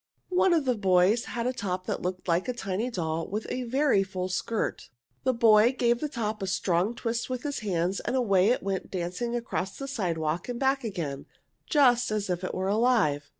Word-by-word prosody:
One 365 0 +3
of 325 -4 +2
the 255 - +3
boys 195 +1 +3
had 235 0 -4
a 255 - 0
top 185 -5 -4
which - - -1
looked 185 +1 -4
like 170 +4 +1
a 250 - -1
tiny 205 +1 -2
doll 165 -6 -2
with 210 +3 -4
a 250 0 -2
very 265 -3 +2
full 185 -1 -3
skirt. 215 +4 -2 0.4
The 260 - +4
boy 230 0 +5
gave 240 0 +2
the 300 - -2
top 220 -5 -3
a 195 - -2
strong 185 +4 0
twist 235 0 -2
with 255 -1 -3
his 285 -1 -3
hands, 185 -2 -1
and - - -2
away 200 -6 +3
it 250 - +1
went 195 -1 -3
dancing 185 +7 -3
across 200 -5 -3
the 275 - -5
sidewalk 170 - -2
and 240 -1 -3
back 270 0 +1
again, 160 -11 -4 0.4
just 250 -5 +4
as 210 -3 -1
if 180 +1 -2
it 185 - -3
were 190 +1 -1
alive. 205 - +2
215 Hz, 205 wpm, -27 LUFS, 185-245 Hz, 0.4 s, boy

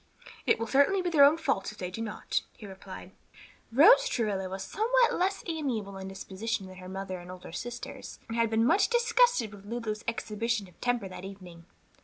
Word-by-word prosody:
"It - - +5
will 230 - -2
certainly 285 - +3
be 350 - -1
their 295 -4 +7
own 290 +3 +7
fault 280 -13 -1
if 210 - -15
they 180 -1 -5
do 225 - -5
not," 220 -2 -2 0.2
he 215 - -10
replied. 190 -1 -10 0.6
Rose 445 - +7
Travilla 200 - -1
was 190 +1 -5
somewhat 475 - +2
less 385 +2 0
amiable 255 - -3
in 190 - -6
disposition 195 +2 -4
than 185 0 -11
her 185 0 -9
mother 190 -1 -5
and 175 0 -11
older 180 -2 -9
sisters, 240 +7 -7
and 225 - -5
had 230 -1 +2
been 225 +1 +2
much 380 - +4
disgusted 475 - +3
with 200 -1 -12
Lulu's 220 -2 -4
exhibition 230 -2 -2
of 180 - -22
temper 245 -5 0
that 185 -1 -9
evening. 180 -4 -10
225 Hz, 195 wpm, -29 LUFS, 190-280 Hz, 0.6 s, their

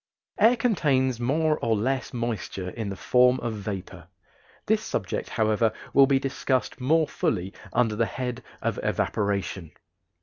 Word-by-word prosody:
Air 225 +4 +6
contains 140 - +1
more 150 +5 +1
or 115 -1 +1
less 130 +5 -1
moisture 115 -6 -3
in 110 -1 -4
the 100 - -4
form 125 +5 +4
of 115 - -2
vapor; 95 -4 -6 0.6
this - - +2
subject, - - -3
however, 110 0 +2 0.2
will 135 -1 +7
be 135 -1 +4
discussed 135 -1 -1
more 155 +4 +3
fully 95 +3 -1 0.2
under 115 -3 +2
the 115 +1 +1
head 125 -1 -4 0.2
of - - -1
evaporation. 100 -5 -1
120 Hz, 140 wpm, -26 LUFS, 105-135 Hz, 0.6 s, will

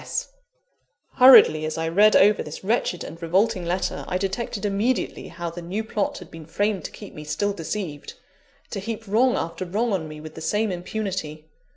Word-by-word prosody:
S. - - -4
S." - - -38 0.9
Hurriedly 250 -11 +8
as 155 +1 -3
I 165 0 -1
read 205 +6 +5
over 205 +2 +5
this 155 +4 -8
wretched 200 -4 0
and 165 - -9
revolting 180 +2 +1
letter, 180 +2 -2
I 185 - -1
detected 195 +2 -3
immediately 205 +5 -1
how 170 0 -6
the 175 +1 -8
new 190 +6 -3
plot 215 -2 -2
had 180 - -12
been 160 -2 -11
framed 200 0 -1
to - - -5
keep - - -11
me 150 - -9
still 160 +7 -1
deceived; 165 -4 -5 0.6
to 200 - -3
heap 225 +2 -5
wrong 245 +5 +3
after 170 +2 -3
wrong 210 +5 -1
on 165 -5 -2
me 155 0 -9
with 155 0 -10
the 160 - -9
same 210 +5 0
impunity. 180 -4 -5
190 Hz, 195 wpm, -24 LUFS, 165-210 Hz, 0.9 s, Hurriedly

